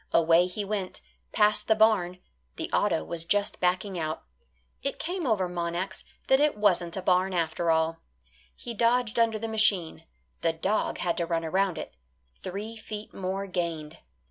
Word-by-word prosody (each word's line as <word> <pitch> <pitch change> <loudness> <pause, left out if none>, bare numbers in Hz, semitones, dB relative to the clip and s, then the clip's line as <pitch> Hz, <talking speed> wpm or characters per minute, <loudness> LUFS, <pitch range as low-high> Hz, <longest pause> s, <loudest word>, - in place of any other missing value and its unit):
Away 170 +1 +5
he 200 +3 -4
went, 195 -2 -3 0.3
past 210 0 +3
the 220 - +4
barn; 215 -5 +3 0.4
the - - -5
auto 80 - +2
was 165 - -3
just 205 +4 0
backing 185 +1 0
out; 155 0 -3 0.6
it 275 - -3
came 350 -2 -3
over 200 -6 +2
Monax 175 +1 -3 0.2
that 265 - +4
it 295 -5 +2
wasn't 180 -4 +2
a 190 - -4
barn 185 +1 +2
after 165 0 0
all. 160 0 +2 0.6
He 235 - -7
dodged 235 +1 +2
under 225 -1 +3
the 225 +1 -4
machine; 215 -7 +1 0.4
the 165 -1 +2
dog 190 +6 -1
had 170 -1 -1
to 170 - -1
run 165 -1 -1
around 185 +1 +1
it; - - -6 0.5
three 205 +5 -5
feet 215 -1 -8
more 195 +1 -3
gained. 170 -4 -4
185 Hz, 165 wpm, -28 LUFS, 170-215 Hz, 0.6 s, Away